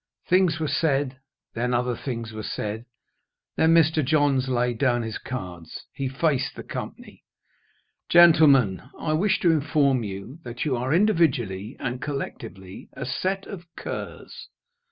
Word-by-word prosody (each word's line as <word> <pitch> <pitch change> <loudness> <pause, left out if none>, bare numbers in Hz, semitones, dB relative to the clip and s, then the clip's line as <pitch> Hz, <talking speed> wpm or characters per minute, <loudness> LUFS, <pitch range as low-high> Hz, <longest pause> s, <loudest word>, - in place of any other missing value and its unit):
Things 180 -3 +3
were 155 - -1
said; 140 -4 0 0.3
then 120 +1 -1
other 125 0 0
things 115 -3 -5
were 110 - -5
said 110 +2 -4 0.7
Then 160 +1 +4
Mr. 160 -1 +4
Johns 140 -2 +2
laid 125 -2 0
down 120 -4 +2
his 110 -1 -5
cards; 90 -9 -7
he 135 -2 -3
faced 140 0 0
the - - -8
company. - - -8 0.9
"Gentlemen, 150 - +6 0.2
I 155 - -2
wish 190 +6 +2
to 170 - +4
inform 145 -4 +2
you 100 - -7
that 120 +2 -5
you 140 -4 +1
are, 125 +3 -2
individually 140 - +1
and 125 +1 -4
collectively, 115 -9 -6
a 135 - -6
set 190 +9 -2
of 180 -4 -9
curs." - - -7
135 Hz, 140 wpm, -25 LUFS, 120-155 Hz, 0.9 s, Gentlemen